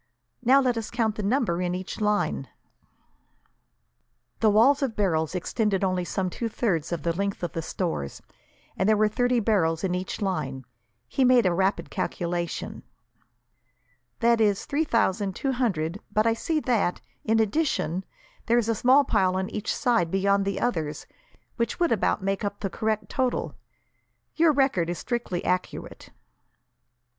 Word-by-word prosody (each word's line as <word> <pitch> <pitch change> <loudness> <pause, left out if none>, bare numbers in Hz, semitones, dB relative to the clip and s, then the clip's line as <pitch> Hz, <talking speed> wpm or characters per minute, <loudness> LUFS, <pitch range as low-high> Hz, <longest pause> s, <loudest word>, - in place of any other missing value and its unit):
"Now, 260 +3 +6
let 245 -3 +1
us 220 - -6
count 230 -3 0
the 215 - -4
number 205 -5 +1
in 180 0 -1
each 185 +4 -6
line." 210 0 0 1.9
The 220 - +4
wall 225 +7 +5
of 260 -5 -1
barrels 165 -5 0
extended 195 +2 0
only 185 -2 0
some 185 +1 -2
two 230 +4 -3
thirds 185 -10 -1
of 170 -4 -3
the 170 - +1
length 200 0 -2
of 175 - -2
the 165 - -2
stores, 160 - -3 0.6
and 190 - +1
there 215 - +4
were 215 +1 +4
thirty 245 +3 +1
barrels 180 -7 +1
in 185 -2 0
each 180 +4 -3
line. 150 - -3 0.4
He 270 - 0
made 250 -3 +5
a 180 - +3
rapid 190 +3 0
calculation. 175 -1 -3 1.4
"That 235 -1 +4
is 205 -2 +2
three 305 +3 0
thousand 200 -6 +1
two 270 - -1
hundred, 195 -9 -1
but 215 +1 +2
I 230 - +4
see 310 +7 -1
that, 225 -9 +1 0.2
in 225 0 +2
addition, 215 - 0 0.4
there 235 - +4
is 235 -2 +1
a - - +3
small 255 +6 +5
pile 185 -8 +1
on 190 0 -2
each 215 +1 -2
side, 230 -9 +1
beyond 195 +2 +2
the 200 -1 -2
others, 160 -11 -2 0.5
which 235 -1 -1
would 345 -1 +2
about 205 -3 +1
make 195 +2 -1
up 205 0 -3
the 195 -3 -2
correct 220 0 -1
total. 260 -2 -1 0.8
Your 325 0 +5
record 265 - +1
is 175 - -2
strictly 235 -8 -3
accurate." 180 0 -3
205 Hz, 160 wpm, -26 LUFS, 180-235 Hz, 1.9 s, Now